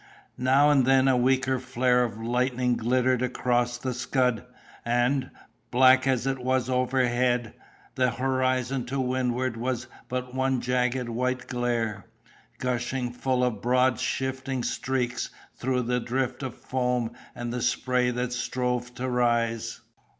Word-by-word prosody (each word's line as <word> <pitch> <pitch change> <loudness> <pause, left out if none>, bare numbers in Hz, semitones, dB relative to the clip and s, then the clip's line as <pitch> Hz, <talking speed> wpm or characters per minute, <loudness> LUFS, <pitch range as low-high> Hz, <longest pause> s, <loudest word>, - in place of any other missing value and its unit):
Now 135 +3 +4
and 140 -3 +4
then 135 0 +5
a 130 - +4
weaker 130 +1 +2
flare 125 -1 +2
of 110 -3 -4
lightning 125 +1 0
glittered 125 +2 +1
across 120 -1 0
the 130 +1 -3
scud; 125 -2 0 0.4
and, 120 +3 +1 0.4
black 130 +1 +5
as 130 -2 +1
it 135 -1 -1
was 130 0 0
overhead, 125 -2 +1 0.4
the 125 -1 +2
horizon 130 0 0
to 135 +2 -2
windward 125 -1 0
was 125 +1 -2 0.2
but 125 0 -3
one 130 0 +1
jagged 125 0 0
white 125 +2 -1
glare, 120 -4 -2 0.5
gushing 125 0 -2
full 125 0 0
of 115 -5 -1
broad 125 +1 +2
shifting 130 -1 -2
streaks 125 -1 -2 0.3
through 125 0 -1
the 125 +1 0
drift 125 +2 -2
of 130 -3 -5
foam 125 -2 -1 0.2
and 120 0 -4
the 125 - -2
spray 125 +1 +1
that 125 0 -2
strove 125 0 -2
to 130 - -3
rise. 120 -2 0
125 Hz, 135 wpm, -26 LUFS, 120-130 Hz, 0.5 s, then